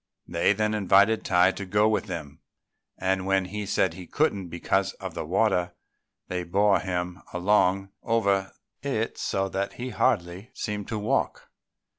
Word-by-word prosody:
They 85 +2 +2
then 105 +1 0
invited 100 +2 +4
Tai 90 +1 +4
to 100 - -6
go 105 +3 +2
with 110 -1 +1
them; 80 -6 -6 0.6
and 95 0 0
when 95 -1 +2
he 105 +2 -5
said 95 -3 +1
he 90 0 -10
couldn't 100 - 0
because 85 +3 0
of - - -7
the - - -4
water, 90 -2 +1 0.5
they 90 0 -2
bore 100 +4 +3
him 90 0 -3
along 95 +1 +2
over 100 -4 +1 0.3
it - - -2
so 95 0 0
that 100 +1 -2
he 125 +1 -5
hardly 100 -4 0
seemed 105 -3 -4
to 110 - -3
walk. 115 +6 -1
95 Hz, 155 wpm, -26 LUFS, 90-105 Hz, 0.6 s, invited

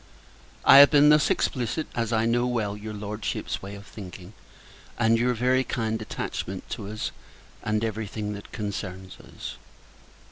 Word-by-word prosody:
I - - +9
have 140 - +10
been 150 0 +6
thus 150 -1 +5
explicit, 125 +5 0
as 115 -2 -1
I 110 0 +2
know 120 +1 +2
well 110 -5 -1
your 105 +1 -7
Lordship's 105 +1 -4
way 100 +1 -7
of 100 0 -11
thinking; 95 -2 -10 0.6
and 115 -1 +3
your 125 +1 +2
very 130 +2 +2
kind 110 -2 -2
attachment 95 -3 -5
to 105 -5 -5
us, 110 +1 -4 0.5
and 110 0 0
to 115 - +1
every 110 0 -4
thing 105 0 -4
that 100 0 -10
concerns 95 -3 -5
us. - - -9
110 Hz, 165 wpm, -26 LUFS, 105-120 Hz, 0.6 s, have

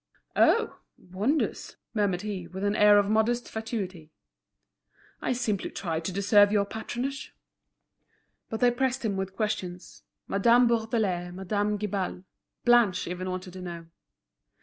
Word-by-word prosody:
"Oh! 455 -1 +3 0.2
wonders!" 205 - -2 0.2
murmured 200 -4 0
he, 195 -5 -4
with 190 +3 -7
an 205 +1 +1
air 210 -1 +6
of 205 -1 +3
modest 220 +3 +1
fatuity. 195 -8 -5 1.1
"I - - -1
simply 235 -6 -1
try 165 -4 -3
to 165 +3 -4
deserve 200 +2 +4
your 205 -1 +2
patronage." 245 +6 -5 1.1
But 220 - -4
they 245 -1 +5
pressed 260 0 -1
him 205 -3 0
with 190 0 -4
questions: 195 -4 -4 0.3
Madame 235 +5 +4
Bourdelais, 220 -6 0
Madame 205 +3 -1
Guibal, 195 -3 -3 0.4
Blanche 240 -6 +4
even 180 +1 -4
wanted 185 0 -5
to 185 - -8
know. 170 -2 -7
205 Hz, 130 wpm, -27 LUFS, 185-225 Hz, 1.1 s, air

